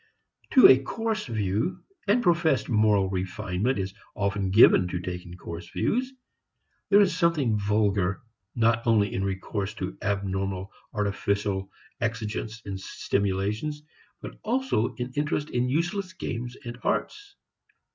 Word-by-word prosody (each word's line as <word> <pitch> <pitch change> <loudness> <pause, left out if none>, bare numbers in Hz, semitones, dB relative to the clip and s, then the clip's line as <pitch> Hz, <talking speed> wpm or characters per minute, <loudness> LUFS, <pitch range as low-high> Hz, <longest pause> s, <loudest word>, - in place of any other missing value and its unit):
To 260 - +10
a 130 - +7
coarse 225 +8 -2
view 110 - -1 0.2
and 235 +5 +3
professed 170 -6 +2
moral 105 -4 +3
refinement 95 +5 -1
is 95 -1 -3 0.2
often 100 -1 -1
given 95 -2 +6
to 90 0 -3
taking 90 0 -6
coarse 85 -1 -8
views 255 +3 0 0.8
there 205 +1 +7
is 190 -4 +3
something 165 -10 +2
vulgar 100 -2 +1 0.3
not 115 0 +2
only 105 -3 +3
in 95 - -1
recourse 100 +2 -3
to - - -4
abnormal 95 -1 -2 0.2
artificial 100 -2 -1 0.3
exigents 110 -1 -3
and 95 -1 -5
stimulations 100 +11 -2 0.4
but - - -8
also 235 - 0
in 125 0 -5
interest 150 +1 -1
in 125 +1 0
useless 180 +6 -1
games 125 -8 -5
and 120 +1 -7
arts. 405 -1 -2
110 Hz, 125 wpm, -27 LUFS, 95-150 Hz, 0.8 s, To